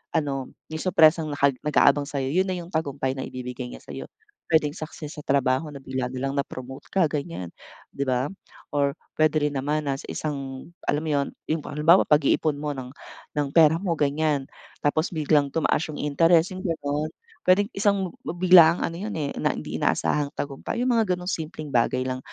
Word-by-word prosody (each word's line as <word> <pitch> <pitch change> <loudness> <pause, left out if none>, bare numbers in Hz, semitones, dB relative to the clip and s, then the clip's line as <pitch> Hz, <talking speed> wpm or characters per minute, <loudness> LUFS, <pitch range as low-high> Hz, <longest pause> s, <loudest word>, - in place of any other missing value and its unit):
ano, 135 -4 -1 0.2
yung 160 0 -6
surpresang 160 -3 +4
naka 140 -1 +2
nag-aabang 145 -1 +3
sa'yo, 135 -2 -2
'yon 190 +2 +2
na 185 - -1
'yong 175 0 -9
tagumpay 140 -4 -1
na 130 - -5
ibibigay 125 0 -6
niya - - -11
sa'yo. - - -8 0.4
Puwedeng 155 -3 +3
success 155 -1 -8
sa - - -6
trabaho 135 +1 +1
na 140 -2 -10
bigla 130 -1 -2
na 130 +1 -7
lang 135 - -1
na-promote 130 -1 -6
ka, 190 -3 +3
ganyan, 140 - -4 0.4
'di 140 0 -3
ba? 130 +3 0 0.4
Or 140 0 +1 0.2
puwede 155 0 +2
rin 145 0 +1
naman 150 +3 -1
nasa 135 -1 -3
isang 140 0 -5 0.2
alam 150 +2 +1
mo 155 - -2
'yon, 140 -1 +1 0.2
'yong 160 -1 0
halimbawa, 165 +5 +4
pag-iipon 150 0 +3
mo 150 0 -3
ng 130 -2 -7 0.5
ng 145 -1 +1
pera 160 -2 +6
mo, 180 -1 -1
ganyan 145 -2 0 0.3
tapos 155 +4 +1
biglang 150 -3 +2
tumaas 160 -1 +1
'yong 155 - -7
interest, 165 +5 +3
'yong 185 - -7
gano'n. 150 -2 -2 0.4
Puwedeng 205 +5 +4
isang 195 -3 +1 0.2
bi 175 +3 -2
biglaang 170 -2 +8
ano 165 - -6
'yon, 210 +1 -4
eh, 145 -2 -2
na - - +1
hindi - - -6
inaasahang 145 -1 +1
tagumpay, 140 +10 -4
'yong 250 +1 +2
mga 210 -5 +2
gano'ng 180 0 -8
simpleng 155 -1 -5
bagay 125 +1 +2
lang. 130 0 -2
150 Hz, 185 wpm, -25 LUFS, 140-165 Hz, 0.5 s, biglaang